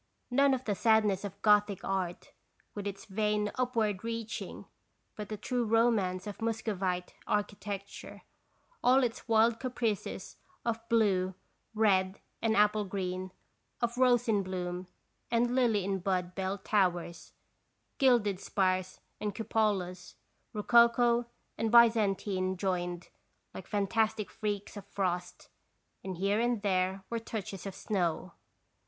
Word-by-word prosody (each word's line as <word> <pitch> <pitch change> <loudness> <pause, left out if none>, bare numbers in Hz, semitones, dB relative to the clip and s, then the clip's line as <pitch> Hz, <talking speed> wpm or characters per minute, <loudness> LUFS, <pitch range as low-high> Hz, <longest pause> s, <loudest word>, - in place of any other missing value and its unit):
None 275 +1 +4
of 255 - -6
the 210 - +1
sadness 210 -2 +3
of 200 0 -6
Gothic 210 -2 +4
art, 185 -3 -3 0.4
with 205 -1 -5
its 200 +2 -6
vain 210 0 0
upward 225 -6 0
reaching, 230 -1 -5 0.5
but 210 -2 -7
the 215 - -4
true 245 +4 -1
romance 220 -5 +2
of 205 +1 -7
Muscovite 195 -5 -2
architecture, 205 -1 -4 0.6
all 260 +2 +5
its 240 +1 -3
wild 225 0 +4
caprices 235 -5 -3 0.3
of 230 -1 0
blue, 190 -5 +2 0.4
red, 195 -3 +2 0.2
and 225 -1 +2
apple 210 0 +4
green, 185 -1 -3 0.5
of 235 0 -1
rose 245 -1 +3
in 210 -3 +3
bloom 180 -1 -4 0.4
and 240 +1 +2
lily 230 -7 +2
in 195 -1 -1
bud 180 -1 -1
bell 190 +1 -2
towers, 175 -5 -1 0.7
gilded 235 -8 +3
spires 185 -2 -1 0.2
and 210 -1 -3
cupolas, 195 -5 -1 0.4
rococo 235 +2 +4 0.3
and 225 -1 0
Byzantine 205 -5 +4
joined, 175 -2 -2 0.4
like 190 - -9
fantastic 215 +1 0
freaks 205 -2 -4
of 200 -1 -9
frost, 180 -3 -3 0.5
and 190 -2 -5
here 200 +3 +1
and 235 -2 0
there 190 -1 0
were 230 - -1
touches 215 -3 -6
of 195 - -6
snow. 185 -4 -2
205 Hz, 125 wpm, -31 LUFS, 190-225 Hz, 0.7 s, all